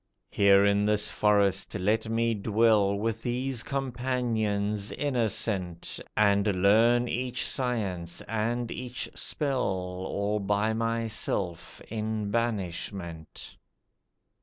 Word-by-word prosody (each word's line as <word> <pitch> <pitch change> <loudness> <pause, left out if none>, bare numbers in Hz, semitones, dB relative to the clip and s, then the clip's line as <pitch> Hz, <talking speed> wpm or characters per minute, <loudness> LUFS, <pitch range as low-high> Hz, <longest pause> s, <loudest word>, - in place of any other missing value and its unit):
Here 100 0 +5
in 100 0 +3
this 105 -1 +3
forest 100 -2 +2
let 105 +3 0
me 115 0 +1
dwell, 105 -1 +3
With 110 +2 -2
these 125 0 -2
companions 120 -6 -1
innocent, 110 - -2 0.2
And 100 -2 +3
learn 115 +4 +5
each 125 +1 -2
science 100 -10 -2
and 115 +2 -2
each 125 0 -4
spell 140 -4 -1
All 95 +2 -2
by 105 +2 0
myself 110 -6 -2
in 110 -1 -3
banishment. 95 -7 -4
105 Hz, 95 wpm, -28 LUFS, 100-115 Hz, 0.2 s, Here